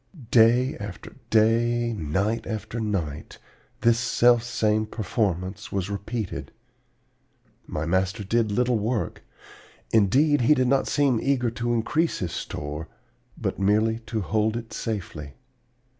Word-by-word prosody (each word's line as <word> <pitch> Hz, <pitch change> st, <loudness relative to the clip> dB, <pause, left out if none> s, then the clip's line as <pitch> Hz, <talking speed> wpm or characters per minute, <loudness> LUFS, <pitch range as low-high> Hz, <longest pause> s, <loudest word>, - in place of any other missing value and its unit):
"Day 120 Hz, +3 st, +5 dB
after 100 Hz, -2 st, -8 dB
day, 115 Hz, +2 st, +3 dB
night 100 Hz, +5 st, -1 dB
after 110 Hz, +1 st, -4 dB
night, 95 Hz, -10 st, -3 dB, 0.4 s
this 115 Hz, 0 st, +4 dB
selfsame 115 Hz, -3 st, +2 dB
performance 100 Hz, -2 st, -2 dB
was 100 Hz, 0 st, -2 dB
repeated. 105 Hz, 0 st, -4 dB, 1.2 s
My 75 Hz, -, -3 dB
master 95 Hz, +5 st, 0 dB
did 110 Hz, +2 st, +1 dB
little 120 Hz, +1 st, +1 dB
work; 110 Hz, +2 st, -2 dB, 0.7 s
indeed, 130 Hz, +8 st, +4 dB
he 135 Hz, +6 st, +5 dB
did 130 Hz, -2 st, +2 dB
not 135 Hz, +1 st, +2 dB
seem 140 Hz, -5 st, +2 dB
eager 125 Hz, -3 st, +1 dB
to 120 Hz, +1 st, -2 dB
increase 155 Hz, +9 st, 0 dB
his 90 Hz, -3 st, -3 dB
store, 75 Hz, +1 st, -5 dB, 0.5 s
but -, -, -3 dB
merely 110 Hz, +3 st, +2 dB
to 110 Hz, -2 st, -2 dB
hold 110 Hz, +3 st, 0 dB
it 115 Hz, -1 st, -8 dB
safely. 85 Hz, -10 st, -5 dB
110 Hz, 120 wpm, -25 LUFS, 100-120 Hz, 1.2 s, Day